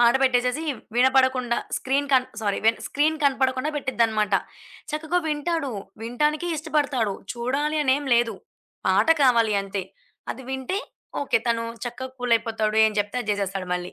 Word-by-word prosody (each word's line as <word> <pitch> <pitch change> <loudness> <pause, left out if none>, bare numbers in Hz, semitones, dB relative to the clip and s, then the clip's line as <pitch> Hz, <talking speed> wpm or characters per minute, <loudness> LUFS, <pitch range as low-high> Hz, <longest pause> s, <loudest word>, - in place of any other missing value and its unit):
పాట 240 0 +6
పెట్టేసేసి, 250 +3 +2 0.3
వినపడకుండా 260 -1 +3 0.2
స్క్రీన్ 280 +2 0
కన్ 255 -1 +4
సారీ 205 -2 0
వె 225 - +7 0.2
స్క్రీన్ 310 +2 +1
కనపడకుండా 265 +1 +1
పెట్టిద్దిన్నమాట. 220 -7 +1 0.6
చక్కగా 320 +3 0
వింటాడు. 300 -2 -1 0.3
వినటానికి 300 +8 0
ఇష్టపడతాడు, 285 -9 0 0.2
చూడాలని 275 +3 +1
ఏం 290 - -7
లేదు. 235 -1 +2 0.5
పాట - - +3
కావాలి 230 -5 +4
అంతే. 195 -1 -4 0.5
అది 265 - -11
వింటే 265 +8 -2 0.4
ఓకే. - - +2
తను 230 0 +1 0.2
చక్కగా 255 +2 -6
కూలయిపోతాడు 225 -2 +1
ఏం 215 - -1
చెప్తే 205 +4 -4
అది 215 - -12
జేసేస్తాడు 195 -2 -2
మళ్ళీ. 180 0 -5
255 Hz, 135 wpm, -24 LUFS, 225-285 Hz, 0.6 s, వె